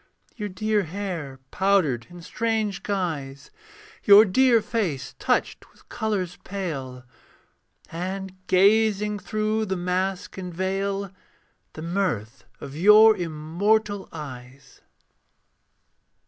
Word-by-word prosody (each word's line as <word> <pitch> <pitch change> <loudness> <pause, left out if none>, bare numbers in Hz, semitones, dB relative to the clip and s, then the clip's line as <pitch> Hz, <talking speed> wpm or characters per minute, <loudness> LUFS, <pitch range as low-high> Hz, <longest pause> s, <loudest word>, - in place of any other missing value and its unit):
Your 210 -3 -4
dear 210 +3 0
hair 170 -7 -5
powdered 185 -12 +1
in 175 -1 -12
strange 220 -1 -2
guise, 160 - -4 0.5
Your 205 +2 +8
dear 240 +4 +4
face 180 - -3
touched - - -1
with - - -25
colours 195 -6 -3
pale: 140 -10 -5 0.9
And 185 +3 -5
gazing 210 +2 +3
through 215 +1 -1
the 190 -1 -2
mask 185 +2 -2
and 180 -1 -6
veil 195 +2 -2 0.6
The 155 - -8
mirth 165 - -2
of 135 - -9
your 210 +6 +7
immortal 190 +5 -1
eyes. 135 -3 -10
190 Hz, 100 wpm, -24 LUFS, 160-210 Hz, 0.9 s, Your